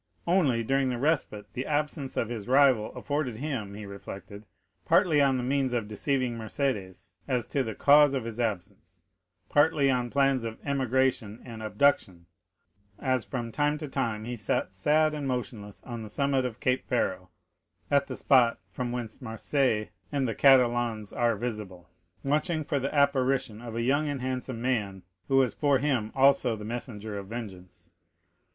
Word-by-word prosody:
Only, 150 -10 +2
during 135 +2 +1
the 125 - -2
respite 135 -7 0
the 130 - -4
absence 150 -2 -2
of 115 - +1
his 115 -3 -5
rival 130 -4 +4
afforded 145 -5 -2
him, 120 -8 -4
he 105 0 -7
reflected, 100 +1 -9 0.4
partly 155 -5 +4
on 135 -2 +3
the 125 - -2
means 135 0 0
of 115 -4 -1
deceiving 125 +3 -1
Mercédès 110 -5 -3 0.2
as 125 -4 0
to 140 - -1
the 110 -5 -4
cause 145 -1 +6
of 130 - -2
his 115 0 -6
absence, 95 -5 -4 0.4
partly 145 -2 +3
on 125 -1 0
plans 135 -1 +2
of 115 -1 -5
emigration 130 -5 0
and 115 -3 -8
abduction, 105 -5 +1 0.7
as 130 -3 0
from 120 -3 -5
time 145 +3 +1
to 150 0 -6
time 110 -5 -2
he 120 +1 -4
sat 105 -2 -1
sad 155 +9 +2
and 145 -2 -3
motionless 115 -5 -5
on 120 -3 -6
the 110 - -8
summit 135 +2 0
of 120 -2 -5
Cape 130 0 +1
Pharo, - - -1 0.6
at 140 -1 +3
the - - -5
spot 125 -4 +4
from 125 -1 -4
whence 120 0 -5
Marseilles 115 -1 0 0.2
and 140 -3 0
the 115 - -1
Catalans 120 -5 +3
are 120 -1 +1
visible, 100 -6 -6 0.3
watching 155 +3 0
for 145 -1 -1
the 135 +1 -2
apparition 135 -5 +1
of 115 -2 -7
a 115 - -1
young 140 +4 +1
and 140 -2 -3
handsome 130 -2 -4
man, 105 -7 -1 0.2
who 135 - +2
was 130 -3 +3
for 145 -2 +2
him 130 -6 0
also 135 -3 +4
the 105 -1 -8
messenger 110 -3 -5
of 100 - -9
vengeance. 100 -5 -9
125 Hz, 170 wpm, -28 LUFS, 110-140 Hz, 0.7 s, cause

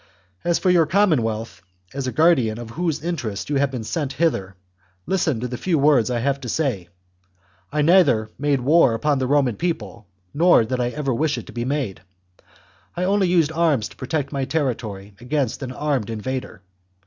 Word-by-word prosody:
As 175 -1 +2
for 185 - +2
your 170 -3 +4
commonwealth, 120 - +1 0.3
as 135 -1 -3
guardian 130 -7 +3
of 120 -1 -8
whose 160 +1 -2
interests 135 - -4
you 145 - +2
have 140 0 +2
been 125 -4 -5
sent 140 +3 -3
hither, 130 - -1 0.5
listen 170 -10 0
to 125 - -3
the 125 0 -6
few 175 -4 +1
words 140 -6 +3
I 120 -2 -1
have 140 +2 0
to 125 - -6
say: 115 - -1 0.8
I 150 0 +1
neither 145 - +4
made 145 -2 +1
war 140 -2 +4
upon 145 +4 0
the 130 - -1
Roman 135 -5 +2
people, 160 - -4 0.3
nor 170 -4 +5
did 125 +3 -3
I 120 -1 0
ever 140 0 -2
wish 150 +4 0
it - - -6
to - - -12
be 120 0 -3
made; 135 -7 -2 1.0
I 180 - 0
only 195 0 +2
used 170 -4 +2
arms 160 -9 +1
to - - -16
protect 140 +1 -3
my 140 -2 -2
terri 135 -2 0
tory 100 -3 -9
against 130 0 -2
an 130 -2 -5
armed 135 -4 -2
invader. 115 -2 -5
135 Hz, 185 wpm, -22 LUFS, 120-160 Hz, 1.0 s, nor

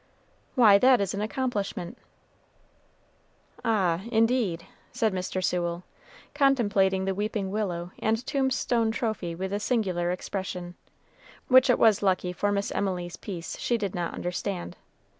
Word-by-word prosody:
"Why, 215 -6 +7
that 255 0 +5
is 200 -3 -1
an 200 - -3
accomplishment." 210 -6 -3 1.7
"Ah, 190 -6 +1
indeed!" 225 -7 +1 0.3
said 220 -3 0
Mr. 185 0 -3
Sewell, 175 -1 -1 0.5
contemplating 205 -9 +2
the 195 - 0
weeping 205 -1 -2
willow 180 -4 -3
and 225 +2 0
tombstone 260 -4 +1
trophy 220 -7 -2
with 190 +3 -4
a 205 - 0
singular 190 -7 0
expression, 180 -1 -4 0.8
which 260 0 +6
it 245 - +5
was 220 -3 +4
lucky 185 -2 +1
for 205 +3 0
Miss 200 0 -1
Emily's 180 -3 -2
peace 175 -5 -7
she 240 - 0
did 200 -4 -3
not 175 -1 -3
understand. 180 +1 -4
200 Hz, 130 wpm, -27 LUFS, 180-225 Hz, 1.7 s, Why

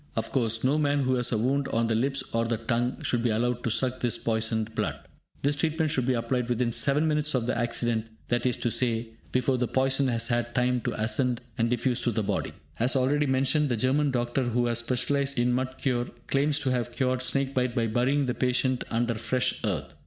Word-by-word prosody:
Of - - -2
course, 115 -3 0
no 140 +4 +2
man 145 -1 +1
who 130 0 +1
has 125 -1 +1
a 115 - +1
wound 135 +5 0
on 115 +1 0
the 115 - 0
lips 135 +5 0
or 115 0 +1
the 115 0 0
tongue 120 +2 -1
should 120 - +1
be 120 - +1
allowed 120 +2 0
to - - 0
suck 130 +3 0
this 120 -2 +1
poisoned 110 -1 -1
blood. - - -1 0.5
This 145 +1 +2
treatment 155 +1 0
should 130 -5 0
be 130 - +2
applied 120 +1 -1
within 120 0 +1
7 145 +6 +2
minutes 150 -1 +1
of 120 -3 0
the 125 - -1
accident, 120 -1 -1 0.2
that 120 +1 +1
is 125 - 0
to 120 - -1
say, 115 -2 0 0.2
before 130 0 +1
the 125 - +1
poison 135 +2 +1
has 115 -2 +1
had 120 0 -1
time 125 0 +2
to - - 0
ascend 115 +3 +1 0.2
and 115 -1 +1
diffuse 120 0 +1
through 120 - 0
the 110 - 0
body. - - -2 0.3
As 125 +4 +2
already 140 +3 +2
mentioned, 135 +3 +2
the 120 - 0
German 140 +5 +2
doctor 120 0 0
who 120 -1 0
has 120 -1 +1
specialised 135 +3 0
in 120 +1 +2
mud 130 +1 -2
cure, 125 -3 -1 0.2
claims 140 +1 +1
to 140 -4 -1
have 120 -1 -1
cured 130 -1 0
snake 135 +1 -1
bite 125 -2 0
by 115 -2 +1
burying 125 +6 +1
the 125 - -1
patient 130 0 0
under 120 +1 0
fresh 125 +3 -1
earth. - - -2
125 Hz, 225 wpm, -27 LUFS, 120-135 Hz, 0.5 s, no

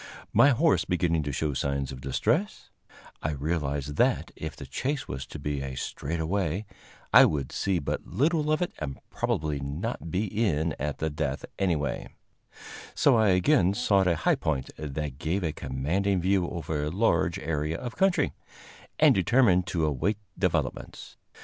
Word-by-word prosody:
My 140 - +7
horse 145 +4 +3
beginning 85 -2 +1
to 70 -1 -3
show 75 +2 -1
signs 70 0 -1
of 65 -1 -8
distress, 170 - -1 0.5
I 80 - -1
realized 75 -1 -2
that, - - +2
if - - -6
the - - -9
chase 140 +2 -3
was 65 +1 -5
to 75 - -8
be 70 -1 -3
a 65 -1 -5
straightaway, 85 +7 -2 0.5
I - - +10
would 70 -5 -1
see 95 -2 0
but 70 - -3
little 155 +2 +1
of 155 +3 +2
it 175 - -3
and 65 -1 -5
probably 75 -2 -1
not 80 - -4
be 95 +6 0
in 90 -7 0
at 75 +1 -2
the 80 0 -2
death 75 -2 -2
anyway; 80 -7 -1 0.9
so 140 - +4
I 110 -1 +4
again 95 - +3
sought 100 -2 +3
a 85 - +3
high 80 - +2
point 70 -5 -2
that 75 -2 -5
gave 90 +4 -1
a 80 -3 -1
commanding 85 +10 -1
view 95 0 +1
over 80 -3 -3
a - - -1
large 85 -2 +1
area 80 -2 -2
of 120 - -6
country, 190 -2 +2 0.6
and - - +6
determined 95 -2 +3
to 80 -3 0
await 80 +8 0 0.2
developments. - - -2
80 Hz, 160 wpm, -27 LUFS, 75-100 Hz, 0.9 s, I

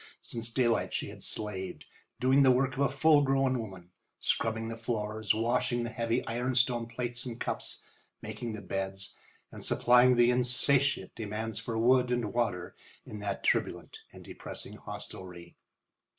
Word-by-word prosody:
Since 115 0 -2
daylight 120 -2 +1
she - - -2
had - - -11
slaved, 95 -3 -4 0.3
doing 130 +2 +4
the 135 - +6
work 130 +1 +3
of 130 - -7
a 140 - +3
full 145 +2 +5
grown 135 -2 +2
woman, 95 -5 -8 0.3
scrubbing 110 0 0
the 115 - -4
floors, 110 -1 -1
washing 120 +1 +1
the 120 - -4
heavy 115 +1 -1
ironstone 120 0 +1
plates 120 +1 -4
and 120 -1 -6
cups, - - -3 0.4
making 120 -2 -5
the 105 -1 -7
beds, 95 +1 -4 0.4
and - - -9
supplying 125 +1 +5
the 120 0 +5
insatiate 125 +3 +3
demands 110 0 -4
for 115 0 -4
wood 125 +2 +4
and 120 -4 -1
water 105 -7 -1 0.3
in 105 - -8
that 100 -1 -3
turbulent - - 0
and - - -13
depressing - - -8
hostelry. 90 -2 -9
120 Hz, 150 wpm, -30 LUFS, 110-125 Hz, 0.4 s, the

